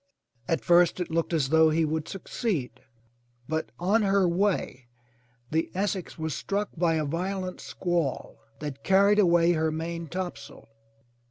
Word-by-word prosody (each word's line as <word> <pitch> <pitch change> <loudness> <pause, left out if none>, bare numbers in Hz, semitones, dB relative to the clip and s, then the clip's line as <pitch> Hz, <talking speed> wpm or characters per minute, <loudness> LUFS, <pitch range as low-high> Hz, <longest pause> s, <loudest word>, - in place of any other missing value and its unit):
At 165 - -1
first 175 +1 +4
it 180 - -3
looked 165 +1 0
as 150 -6 +1
though 160 +1 +5
he 160 +1 +2
would 155 0 -2
succeed, 175 - -3 0.7
but 160 +1 -2
on 200 +6 +2
her 195 -2 +3
way 175 -8 -1 0.6
the 160 +1 0
Essex 195 -1 -2
was 160 -2 -3
struck 200 +8 -2
by 170 -1 +2
a 155 -1 0
violent 185 +4 -3
squall 175 -6 -2 0.2
that 140 -2 -6
carried 200 +2 +4
away 175 -3 +4
her 160 -1 +1
maintopsail. 170 +2 -5
170 Hz, 140 wpm, -27 LUFS, 160-190 Hz, 0.7 s, though